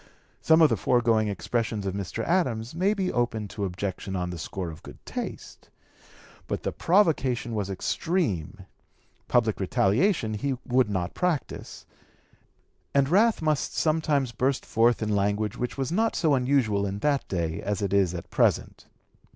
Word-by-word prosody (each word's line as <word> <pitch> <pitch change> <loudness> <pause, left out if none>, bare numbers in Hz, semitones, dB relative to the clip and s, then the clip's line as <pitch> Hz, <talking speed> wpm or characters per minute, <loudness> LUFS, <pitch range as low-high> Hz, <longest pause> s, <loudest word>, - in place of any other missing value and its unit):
Some 160 0 +5
of 155 - +6
the - - +1
foregoing 115 -3 +2
expressions 105 +1 -2
of 95 - -2
Mr. 100 +3 -4
Adams 125 -10 0
may 190 +5 +1
be 190 -2 -1
open 115 -3 -1
to 100 0 -3
objection 95 +1 -4
on 90 -1 -2
the 90 - -6
score 90 +1 -5
of 80 - -12
good - - -12
taste; - - -7 0.8
but - - -3
the - - -1
provocation 145 - +1
was 105 -3 -2
extreme; 105 - -2 0.6
public 115 -3 +2
retaliation 110 - +1
he 130 +5 -2
would 125 -2 +2
not 95 -3 -2
practise, 180 -5 -3 1.1
and 140 -1 +3
wrath 210 +1 +3
must 155 -2 0
sometimes 155 -5 +1
burst 130 +3 -1
forth 115 0 +2
in 105 -1 0
language 105 +1 0
which 125 +2 -4
was 135 +1 -2
not 220 +5 +1
so 155 -4 +2
unusual 125 -7 +2
in 100 +1 -4
that 140 +5 0
day 85 -3 -2
as 100 0 -2
it 100 -1 -1
is 95 -3 +2
at 85 - -8
present. - - +1
115 Hz, 160 wpm, -26 LUFS, 100-145 Hz, 1.1 s, of